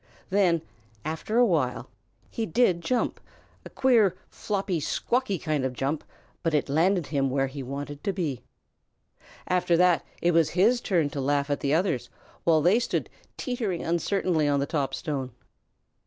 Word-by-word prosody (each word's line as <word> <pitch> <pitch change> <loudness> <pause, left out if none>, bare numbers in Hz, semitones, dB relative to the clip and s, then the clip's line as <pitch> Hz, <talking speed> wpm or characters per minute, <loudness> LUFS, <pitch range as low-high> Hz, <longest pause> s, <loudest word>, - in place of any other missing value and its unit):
Then, 180 -5 +3 0.4
after 160 +8 -2
a 245 - +6
while, 150 - 0 0.4
he 225 - -2
did 175 -2 +2
jump, 245 +8 -1 0.4
a - - -10
queer, 225 -9 +3
floppy, 195 -4 -2
squawky 240 - 0
kind 155 -3 -1
of 130 -1 -1
jump, 135 +4 -2 0.4
but 165 -2 0
it 145 - 0
landed 170 +4 +2
him 140 -2 0
where 135 +1 +1
he 135 +1 -6
wanted 140 +2 -6
to 200 - +2
be. 160 - -3 1.1
After 180 -2 +2
that 180 -1 +4 0.2
it 175 - +2
was 165 -2 +3
his 235 +6 +4
turn 165 -7 +1
to 140 - -3
laugh 140 +1 0
at 145 - 0
the 140 +2 +1
others 170 -8 0 0.4
while 160 -3 +4
they 190 +7 +5
stood 245 - -2 0.3
teetering 230 -9 -2
uncertainly 170 -2 +1
on 145 -1 +2
the 140 - 0
top 140 -3 -1
stone. 135 -5 -4
165 Hz, 160 wpm, -27 LUFS, 145-195 Hz, 1.1 s, a